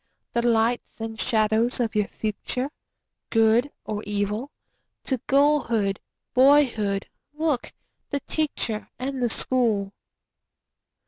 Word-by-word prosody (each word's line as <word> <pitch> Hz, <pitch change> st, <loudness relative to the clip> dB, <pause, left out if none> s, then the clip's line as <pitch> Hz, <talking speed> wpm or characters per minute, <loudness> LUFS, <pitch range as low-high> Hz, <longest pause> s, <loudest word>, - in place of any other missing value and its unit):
The 235 Hz, -, +2 dB
lights 235 Hz, 0 st, +1 dB
and 225 Hz, -1 st, -4 dB
shadows 225 Hz, +1 st, +2 dB
of 230 Hz, -2 st, 0 dB
your 210 Hz, -2 st, +1 dB
future—good 225 Hz, +1 st, -1 dB
or 210 Hz, -1 st, -3 dB
evil? 205 Hz, +5 st, -1 dB, 0.5 s
To 260 Hz, -2 st, -1 dB
girlhood, 250 Hz, -8 st, +2 dB, 0.3 s
boyhood 250 Hz, -7 st, +4 dB, 0.3 s
look—the 295 Hz, -1 st, -3 dB
Teacher 260 Hz, -8 st, -2 dB
and 265 Hz, +1 st, -3 dB
the 240 Hz, -, +2 dB
School. 220 Hz, -5 st, +1 dB
235 Hz, 90 wpm, -25 LUFS, 215-265 Hz, 0.5 s, boyhood